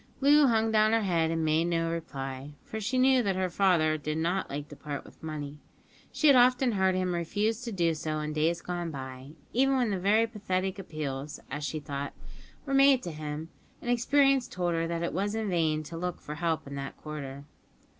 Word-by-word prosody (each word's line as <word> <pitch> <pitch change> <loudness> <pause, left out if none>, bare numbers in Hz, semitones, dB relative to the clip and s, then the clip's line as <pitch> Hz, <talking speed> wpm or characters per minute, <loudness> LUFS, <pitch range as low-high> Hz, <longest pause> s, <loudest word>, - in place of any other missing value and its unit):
Loo 285 +1 +6
hung 225 -2 +2
down 215 0 +4
her 225 -1 +3
head 170 -4 +1
and 165 -1 0
made 155 +2 +2
no 165 -1 0
reply, 140 -3 -5
for 220 - -6
she 245 +5 -1
knew 260 0 +5
that 195 -4 0
her 185 -1 -1
father 170 -5 +3
did 155 +1 -3
not 175 +4 -1
like 145 +1 -5
to 145 - -11
part 145 -1 -6
with - - -17
money. 150 -2 -6 0.5
She - - -2
had 285 -3 +8
often 250 0 +5
heard 190 -3 +2
him 185 -1 0
refuse 205 +7 -1
to 240 -1 -5
do 170 -4 +1
so 155 0 -3
in 150 0 -3
days 160 +3 +1
gone 175 -1 -3
by, 130 -1 -8 0.2
even 270 +2 +3
when 215 -7 +1
very 215 +4 +4
pathetic 195 -4 -2
appeals 150 -5 -5
(as 145 +2 -4
she 155 +1 -2
thought) 140 -1 -5 0.5
were 275 - -3
made 275 -1 +6
to 175 - -4
him; 155 +1 -5 0.3
and 240 - -2
experience 270 +2 +3
told 175 -1 -1
her 165 0 0
that 170 0 -2
it 170 - -2
was 205 +4 -1
in 220 -3 -2
vain 160 -3 +1
to 165 +2 -8
look 180 +1 -3
for 150 - -7
help 165 0 -1
in 140 - -8
that 140 0 -6
quarter. 140 -2 -7
170 Hz, 210 wpm, -29 LUFS, 155-220 Hz, 0.5 s, had